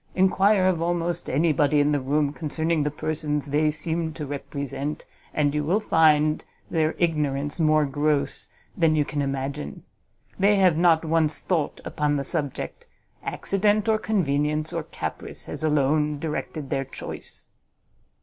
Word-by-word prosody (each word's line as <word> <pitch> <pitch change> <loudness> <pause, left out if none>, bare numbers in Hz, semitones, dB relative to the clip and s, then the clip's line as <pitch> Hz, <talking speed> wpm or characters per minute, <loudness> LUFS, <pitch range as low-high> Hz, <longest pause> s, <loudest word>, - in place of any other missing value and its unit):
Enquire 190 +1 +4
of 185 -3 +2
almost 175 0 -1
any 155 +4 +2
body 145 +1 +3
in 145 +1 +3
the 145 - +2
room 145 +2 0
concerning 155 +3 -1
the 145 - +1
persons 150 -1 -2
they 150 +2 +2
seem 160 +1 -2
to 150 -1 -5
represent, 140 +1 -4 0.3
and 145 -2 +1
you 150 0 0
will 180 +8 +2
find 155 -6 +3 0.3
their 160 -1 +1
ignorance 145 -3 0
more 155 -1 +4
gross 145 0 0 0.3
than 165 -2 +3
you 150 -1 +2
can 145 0 -2
imagine; 135 - -4 0.6
they 200 +2 +5
have 185 -4 +4
not 165 -1 +4
once 160 -1 +2
thought 165 -6 -1
upon 150 -1 0
the 140 - -1
subject; 140 0 -4 0.3
accident, 205 +2 0
or 220 -1 +3
convenience, 150 -7 0
or - - -1
caprice - - -6
has - - -7
alone 150 0 +2
directed 150 -1 -4
their 135 - 0
choice." 135 - -8
155 Hz, 150 wpm, -25 LUFS, 145-165 Hz, 0.6 s, they